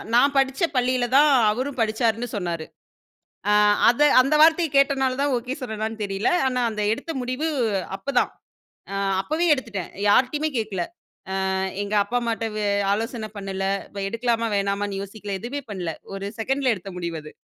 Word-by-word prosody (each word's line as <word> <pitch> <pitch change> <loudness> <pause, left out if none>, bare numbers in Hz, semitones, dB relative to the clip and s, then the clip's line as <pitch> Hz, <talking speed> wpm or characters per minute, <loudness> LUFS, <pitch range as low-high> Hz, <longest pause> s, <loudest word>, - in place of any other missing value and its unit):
நான் 280 +4 +4
படிச்ச 270 +4 +1
பள்ளியில 250 0 +2
தான் 295 +1 +6 0.2
அவரும் 255 +4 -3
படிச்சாருன்னு 225 +1 0
சொன்னாரு. 170 -5 -3 0.9
ஆ - - +5 0.4
அத 240 +4 +1 0.2
அந்த 275 +4 +1
வார்த்தைய 325 +1 +5
கேட்டனாலதான் 275 0 +2
ஓகே 250 +3 -4
சொன்னேனான்னு 220 -2 -4
தெரியல! 195 +1 0 0.2
ஆனா 250 -1 0
அந்த 215 -1 -3
எடுத்த 325 +8 -6
முடிவு 255 +5 -2 0.5
அப்பதான். 275 0 0 0.6
அ - - -2 0.3
அப்பவே 315 - -1
எடுத்துட்டேன். 230 - -4 0.2
யார்ட்டயுமே 270 +8 +3
கேக்கல. 210 -5 -2 0.7
அ - - 0 0.3
எங்க 205 +1 -5
அப்பா 235 +5 -2
அம்மாட்ட 230 -1 -2
வ - - -1 0.3
ஆலோசனை 225 +1 -3
பண்ணல, 195 -1 -4 0.3
வ 195 - -2
எடுக்கலாமா 230 0 0
வேணாமான்னு 200 0 -1
யோசிக்கல! 200 0 -6
எதுவுமே 265 +5 -4
பண்ணல. 180 -5 -3 0.2
1 195 0 -5
செக்கண்டல 265 +2 +1
எடுத்த 195 0 -9
முடிவு 170 -2 -4
அது. 155 - -10
230 Hz, 150 wpm, -24 LUFS, 200-265 Hz, 0.9 s, தான்